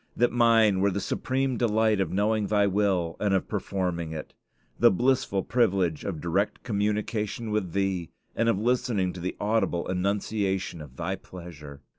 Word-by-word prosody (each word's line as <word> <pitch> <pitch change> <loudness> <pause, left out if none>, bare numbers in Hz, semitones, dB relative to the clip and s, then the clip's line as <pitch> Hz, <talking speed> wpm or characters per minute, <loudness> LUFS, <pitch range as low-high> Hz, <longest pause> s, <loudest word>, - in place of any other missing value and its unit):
that 120 - +3
mine 115 -4 +4
were 100 +1 +3
the 100 - -2
supreme 130 +5 -1
delight 110 -3 +2
of 95 - -1
knowing 105 +1 +1
Thy 105 -1 +3
will 95 -4 +1
and 100 -2 +2
of 95 - -1
performing 90 -5 -2
it! 80 - -7 0.5
the - - +7
blissful 120 -3 +1
privilege 95 -9 +1
of 90 -6 -4
direct 95 +6 -1
communication 105 +1 -2
with 100 -6 -1
Thee, 95 -4 -1 0.3
and 115 +1 +2
of 115 - +2
listening 110 -4 0
to 90 - -8
the 90 +2 -3
audible 105 -5 0
enunciation 95 -1 -1
of 70 -4 -11
Thy - - -2
pleasure! 75 -6 -11
100 Hz, 160 wpm, -27 LUFS, 90-110 Hz, 0.5 s, the